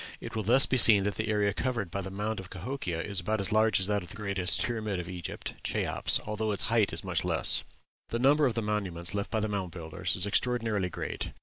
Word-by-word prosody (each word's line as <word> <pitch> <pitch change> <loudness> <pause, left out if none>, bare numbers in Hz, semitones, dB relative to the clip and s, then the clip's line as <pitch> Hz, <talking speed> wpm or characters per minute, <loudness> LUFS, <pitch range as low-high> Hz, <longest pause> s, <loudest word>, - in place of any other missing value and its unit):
It - - -8
will 110 - -1
thus 120 +6 +8
be 130 - 0
seen 110 -5 +8
that 100 +1 -1
the 110 +3 -4
area 105 -1 +1
covered 115 -7 -3
by 100 - -3
the 95 - -6
mound 105 +2 -4
of 95 -1 -10
Cahokia 95 -4 -5
is 100 -2 -1
about 105 +4 -2
as 100 +2 -1
large 110 -1 +3
as 95 - +2
that 105 0 0
of 90 - -11
the - - -10
greatest 100 -4 0
pyramid 110 -5 -3
of 85 - -6
Egypt, 90 -2 -6
Cheops, - - +1
although 105 0 -3
its 100 - +2
height 110 -4 +2
is - - -2
much - - -2
less. - - +2 0.5
The 115 - -2
number 140 +4 +3
of 120 - -3
monuments 100 -5 -3
left 100 0 -3
by 110 - -1
the 110 - -1
Mound 100 -3 -3
Builders 80 -2 -4
is 90 - +1
extraordinarily 110 -3 0
great. - - -6
105 Hz, 235 wpm, -28 LUFS, 95-110 Hz, 0.5 s, thus